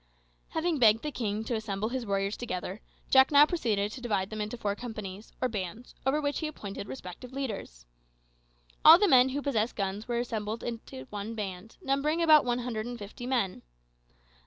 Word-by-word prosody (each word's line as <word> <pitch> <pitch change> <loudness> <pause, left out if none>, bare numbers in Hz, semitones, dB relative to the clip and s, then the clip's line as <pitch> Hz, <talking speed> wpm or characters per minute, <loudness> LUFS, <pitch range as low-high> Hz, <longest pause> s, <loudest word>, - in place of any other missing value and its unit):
Having 320 -1 0
begged 225 -2 +5
the 300 - -2
king 215 -4 -2
to 230 - -3
assemble 215 -1 -2
his 250 -2 -3
warriors 195 +1 0
together, 195 -3 -5 0.3
Jack 265 0 +7
now 290 0 +8
proceeded 215 - 0
to 250 - -8
divide 205 -5 -1
them 215 0 -3
into 215 +3 -4
four 205 -3 -1
companies, 215 -3 -7
or 255 - +1
bands, 215 +1 -5
over 285 +3 +3
which 285 -1 -1
he 315 - -2
appointed 205 -9 -7
respective 245 +1 -8
leaders. 205 - -5 1.0
All 320 +2 +11
the 410 +2 +3
men 260 -5 +6
who 280 +2 -3
possessed 235 -5 0
guns 200 +1 -3
were 240 -1 -1
assembled 225 -2 -3
together 230 - -6
in 130 - -12
one 210 +2 -5
band, 200 0 -6
numbering 280 +4 +1
about 310 -4 +6
one 245 -1 +1
hundred 240 -3 -3
and 245 0 -5
fifty 220 +3 -8
men. 235 -8 0
230 Hz, 185 wpm, -29 LUFS, 205-265 Hz, 1.0 s, All